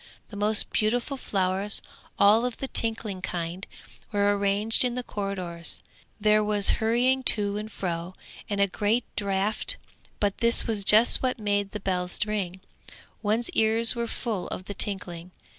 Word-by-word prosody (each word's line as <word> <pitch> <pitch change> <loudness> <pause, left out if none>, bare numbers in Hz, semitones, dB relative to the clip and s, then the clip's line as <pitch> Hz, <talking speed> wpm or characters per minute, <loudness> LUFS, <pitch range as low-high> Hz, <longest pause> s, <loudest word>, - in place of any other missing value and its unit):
The 205 - -11
most 210 +1 0
beautiful 240 +6 -1
flowers, 195 -4 -2 0.4
all 210 +3 +4
of 250 -2 -4
the 270 - -5
tinkling 220 -6 -2
kind, 175 +2 -6 0.4
were 205 0 +1
arranged 200 +3 +2
in 245 -1 -2
the 250 - -4
corridors; 185 -6 -3 0.4
there 215 0 +2
was 210 -1 +2
hurrying 245 +4 +1 0.2
to 205 -1 -3
and 215 +1 -7
fro, 175 -1 -5 0.3
and 205 -1 -3
a 200 - +4
great 210 +5 -1
draught, 200 +1 -1 0.4
but 205 -2 -2
this 235 0 +5
was 215 -3 -1
just 215 +4 +7
what 255 -1 -2
made 205 -2 -2
the 210 - -7
bells 180 -2 -3
ring; 190 -4 -4 0.6
one's 220 +3 -2
ears 225 +1 +7
were 235 0 -3
full 220 -6 -5
of 185 - -7
the 205 - -7
tinkling. 180 -4 -4
205 Hz, 155 wpm, -25 LUFS, 195-225 Hz, 0.6 s, just